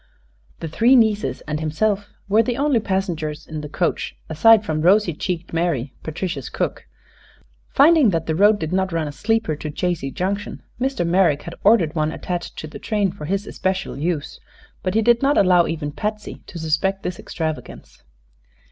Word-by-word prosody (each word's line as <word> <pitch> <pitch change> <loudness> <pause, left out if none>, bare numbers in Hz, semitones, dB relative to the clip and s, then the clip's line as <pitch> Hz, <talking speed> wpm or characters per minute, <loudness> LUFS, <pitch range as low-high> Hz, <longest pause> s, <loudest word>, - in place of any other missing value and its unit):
The 165 - -3
three 230 - +4
nieces 210 - +2
and 150 0 -4
himself 200 +6 -1 0.2
were 210 +3 +4
the 235 +1 -2
only 280 -4 +2
passengers 180 -7 -2
in 155 -1 -6
the 150 - -7
coach, 170 +3 -1
aside 215 +7 +5
from 155 -3 -1
rosy 185 +1 +4
cheeked 170 +2 -4
Mary, 155 -6 -1
Patricia's 170 +3 -4
cook. - - -3 0.9
Finding 295 -3 +6
that 165 -4 -1
the 160 - -1
road 205 +5 +5
did 160 -2 -4
not 190 0 +1
run 165 -2 -1
a - - -4
sleeper 220 -1 0
to 155 - -5
Chazy 165 -2 -2
Junction, 200 +5 -3 0.2
Mr. 260 -8 0
Merrick 170 -4 +2
had 170 - -7
ordered 195 -7 +4
one 155 -1 0
attached 175 +1 -5
to - - -5
the 150 - -10
train 205 -4 0
for 180 -5 -8
his 195 +5 -1
especial 190 -1 -2
use; 155 0 -3 0.4
but 185 +1 -2
he 225 - +3
did 235 +1 +4
not 280 +2 +3
allow 180 -3 +5
even 155 -2 -3
Patsy 210 +6 -5
to 175 - -9
suspect 165 +5 0
this 180 -1 -4
extravagance. 160 -2 -6
180 Hz, 175 wpm, -21 LUFS, 160-210 Hz, 0.9 s, Finding